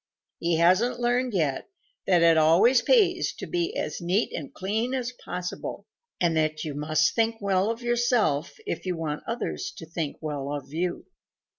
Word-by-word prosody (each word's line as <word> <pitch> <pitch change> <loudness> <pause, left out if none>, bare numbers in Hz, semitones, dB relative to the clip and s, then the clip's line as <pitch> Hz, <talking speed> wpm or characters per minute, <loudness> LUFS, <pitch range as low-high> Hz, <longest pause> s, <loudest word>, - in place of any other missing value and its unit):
He 170 0 +1
hasn't 195 +9 +3
learned 245 -1 +1
yet 150 - -1 0.4
that 175 -3 +4
it 165 -1 +6
always 180 +11 +5
pays 375 - +3
to - - -6
be 350 +5 -2
as - - -3
neat 180 +6 0
and 145 - -5
clean 220 +7 -2
as 250 -1 -2
possible 180 0 -5 0.3
and 170 -2 +2
that 155 0 0
you 150 - -4
must 155 +2 +1
think 225 0 +1
well 195 0 +1
of 230 +1 -4
yourself 240 - +1
if - - -3
you 180 -2 -1
want 150 -2 -3
others 230 +1 -3
to 160 - -8
think 160 -2 -4
well 145 -3 -4
of 145 -1 -7
you. 175 +2 -2
180 Hz, 170 wpm, -26 LUFS, 160-240 Hz, 0.4 s, it